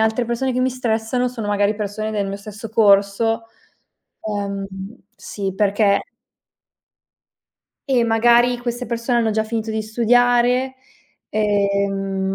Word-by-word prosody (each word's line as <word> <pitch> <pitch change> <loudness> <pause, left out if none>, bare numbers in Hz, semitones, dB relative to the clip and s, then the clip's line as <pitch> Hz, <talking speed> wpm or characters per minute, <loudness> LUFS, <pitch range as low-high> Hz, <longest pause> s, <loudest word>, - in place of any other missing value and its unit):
altre 220 +2 +1
persone 240 +3 -1
che 250 - -1
mi 260 +1 +2
stressano 245 0 -1
sono, 235 -4 -6
magari, 205 +1 +1
persone 215 +1 -4
del 205 -2 -1
mio 195 - -4
stesso 210 +2 -9
corso 215 +1 +3 0.8
Ehm, 200 -2 -3 0.5
sì 195 -2 -5
perché 200 0 +2 1.9
eh, 255 -3 +3
magari 235 +2 +4
queste 240 0 -4
persone 235 +1 0
hanno 225 -1 +1
già 220 +1 0
finito 220 0 -3
di 220 0 -2
studiare, 245 +3 +2 0.5
ehm, 200 -2 0
220 Hz, 120 wpm, -20 LUFS, 205-240 Hz, 1.9 s, magari